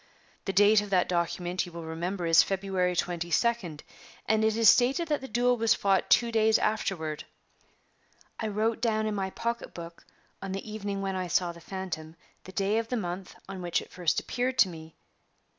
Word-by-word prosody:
The 195 - -1
date 205 +2 +6
of 205 - -7
that 185 -2 +2
document, 175 +1 -1
you - - -10
will 170 0 -7
remember, 170 +3 -3
is 165 -1 +7
February 190 -2 -1
22d, 175 0 -1 0.4
and 220 0 +2
it 220 0 +2
is 230 -1 +4
stated 270 - +4
that 295 -3 0
the 265 - -7
duel 245 +2 +2
was 225 0 +3
fought 195 -1 +1
two 235 -1 +4
days 220 -1 +4
afterward. 165 -8 -2 1.1
I 220 - -2
wrote 220 +2 -1
down 220 -2 +1
in 215 - -1
my 195 -2 -2
pocketbook, 175 -7 -5 0.4
on 195 0 -4
the 195 +3 -5
evening 205 -2 -4
when 195 -1 -2
I 185 -1 -2
saw 175 0 +1
the 170 0 -13
phantom, 170 -4 -6 0.3
the 185 - -9
day 200 +3 +1
of 230 - -4
the 250 - -2
month 180 -2 -5
on 190 -1 -7
which 175 -1 0
it - - -12
first 175 -3 0
appeared 255 +1 -2
to 190 - +5
me. 160 -2 -11
195 Hz, 190 wpm, -28 LUFS, 175-220 Hz, 1.1 s, is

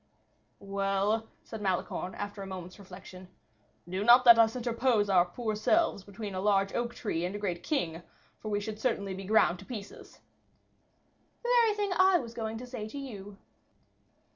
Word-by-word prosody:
"Well," 200 +2 -1 0.2
said 225 -2 -8
Malicorne, 185 -1 -2
after 205 0 -6
a 195 - -6
moment's 185 0 -8
reflection, 185 -1 -12 0.6
"do 185 +3 -3
not 240 +3 +7
let 235 -1 +9
us 225 0 +4
interpose 235 -3 +1
our 180 -2 +5
poor 215 +4 -4
selves 320 - +1
between 200 +1 -7
a 185 - -3
large 195 -1 +2
oak 240 0 -2
tree 170 -6 -3
and 180 +3 -3
a - - -2
great 180 -4 -3
king, 170 - -2 0.4
for 215 - -6
we 205 -1 0
should 215 +1 -6
certainly 200 -5 -1
be 190 +1 -7
ground 185 -4 +3
to - - -12
pieces." 210 -6 -9 1.2
"The 480 - -2
very 455 -3 +4
thing 410 -2 -1
I 375 0 +5
was 235 -7 -6
going 225 -1 -4
to 250 - -7
say 245 -4 -6
to 250 - -9
you." 205 -7 -8
210 Hz, 175 wpm, -30 LUFS, 195-235 Hz, 1.2 s, let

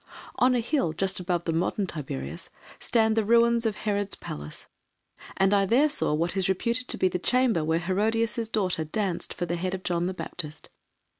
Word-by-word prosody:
On 250 0 +4
a 240 - +2
hill, 230 - 0
just 190 +3 -1
above 175 -1 -1
the 165 - -1
modern 180 +4 0
Tiberias, 85 - -6 0.3
stand 220 -2 +2
the 225 - +2
ruins 235 +1 +4
of 215 - -2
Herod's 205 -2 -1
Palace, 75 +1 -7 0.7
and 195 +1 +3
I 200 -1 +3
there 270 +9 +4
saw 290 - +1
what 170 +4 -1
is 190 -1 +1
reputed 235 +6 0
to - - +1
be 185 - +3
the 180 0 -2
chamber 245 -5 +2
where 160 +1 +1
Herodias' 220 +5 0
daughter 185 -7 0
danced 180 +2 -2
for 175 - -3
the 175 0 -2
head 185 +2 -2
of 185 - -8
John 175 0 0
the 185 - -3
Baptist. 155 -5 -7
190 Hz, 195 wpm, -27 LUFS, 170-225 Hz, 0.7 s, On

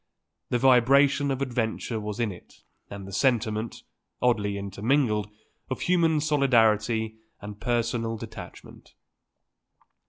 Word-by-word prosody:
The 125 - +1
vibration 135 +3 +4
of 135 0 -1
adventure 120 -2 -2
was 105 +1 -5
in 115 -3 0
it 90 - -15 0.3
and 100 -1 -8
the 95 - -9
sentiment, 110 -2 0 0.4
oddly 105 -5 +1
intermingled, 105 +2 0 0.4
of 130 - -4
human 165 -3 +2
solidarity 115 -6 +2 0.2
and 105 0 -9
personal 115 -1 -1
detachment. - - -11
115 Hz, 105 wpm, -26 LUFS, 105-135 Hz, 0.4 s, vibration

